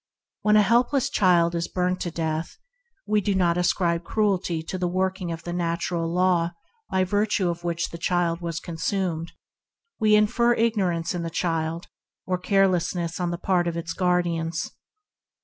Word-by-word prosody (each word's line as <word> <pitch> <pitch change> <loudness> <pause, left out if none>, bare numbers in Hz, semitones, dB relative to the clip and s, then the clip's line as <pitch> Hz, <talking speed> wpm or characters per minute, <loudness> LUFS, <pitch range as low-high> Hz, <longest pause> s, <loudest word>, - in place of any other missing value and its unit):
When 210 0 +4
a 210 -2 +4
little 245 +4 +3
child 180 -10 +3
is 170 0 -1
burnt 180 0 -1
by 175 - -3
matches, 160 +1 -3 0.5
we 210 0 +2
do 200 0 0
not 175 -2 +2
ascribe 175 -1 +1
cruelty 185 -5 0
to 185 +3 -5
the 180 - 0
working 185 0 -1
of 165 0 -6
the 175 - -5
natural 170 -1 -1
law 175 -1 +2 0.4
by 190 0 +2
virtue 205 -1 +1
of 170 0 -8
which 170 -1 -1
the 170 - -8
child 175 -1 0
was 165 -1 -3
injured; 170 -1 -2 0.7
we 215 -1 +5
infer 235 +3 +3
ignorance 190 -8 0
in 175 - -3
the 165 - -3
child, 165 0 -2 0.4
or 185 -1 -1
carelessness 180 -3 +1
on 175 -1 0
the 175 - -3
part 180 -1 +1
of 170 0 -2
its 165 0 -4
guardians. 170 -2 0
175 Hz, 165 wpm, -25 LUFS, 170-190 Hz, 0.7 s, we